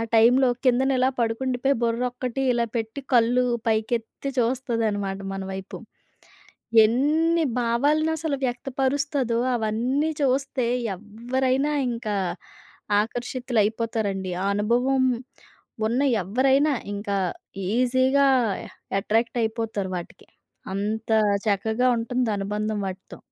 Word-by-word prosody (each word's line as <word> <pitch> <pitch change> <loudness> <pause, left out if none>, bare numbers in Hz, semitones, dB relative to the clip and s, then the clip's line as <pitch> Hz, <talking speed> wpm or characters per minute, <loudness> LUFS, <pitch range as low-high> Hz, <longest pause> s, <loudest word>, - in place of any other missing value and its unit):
టైంలో 245 +4 +5 0.2
కిందన 255 +2 +3
ఇలా 255 +1 +4
పడుకుండిపోయి, 250 +3 0
బుర్రొక్కటి 250 +2 -1
ఇలా 235 -1 +1
పెట్టి, 225 +3 -3
కళ్ళు 245 +1 +4 0.2
పైకెత్తి 225 +4 -1
చూస్తుందనమాట 230 -5 -1
మన 195 - -4
వైపు. 190 0 -6 1.1
ఎన్ని 315 +8 +2 0.2
భావాలను 285 +7 +2
అసలు 310 -2 -1
వ్యక్తపరుస్తదో 265 0 -1 0.2
అవన్నీ 240 +7 0
చూస్తే 270 -1 +1 0.3
ఎవ్వరైనా 255 +7 -1 0.2
ఇంకా 230 -3 -3 0.9
ఆకర్షితులైపోతారండి. 225 -4 -1
ఆ - - -1
అనుభవం 245 +6 +2 0.8
ఉన్న 240 +5 0 0.2
ఎవ్వరైనా 270 - +3 0.2
ఇంకా 200 0 -2 0.6
ఈజీగా 260 +3 +3 0.7
ఎట్రాక్ట్ 225 +4 0
అయిపోతారు 220 -4 -2
వాటికి. 175 - -10 0.5
అంత 215 +3 -2 0.4
చక్కగా 220 +5 +1
ఉంటుంది 245 +1 -1
అనుబంధం 210 +1 -2
వాటితో. 190 0 -7
240 Hz, 90 wpm, -24 LUFS, 220-260 Hz, 1.1 s, టైంలో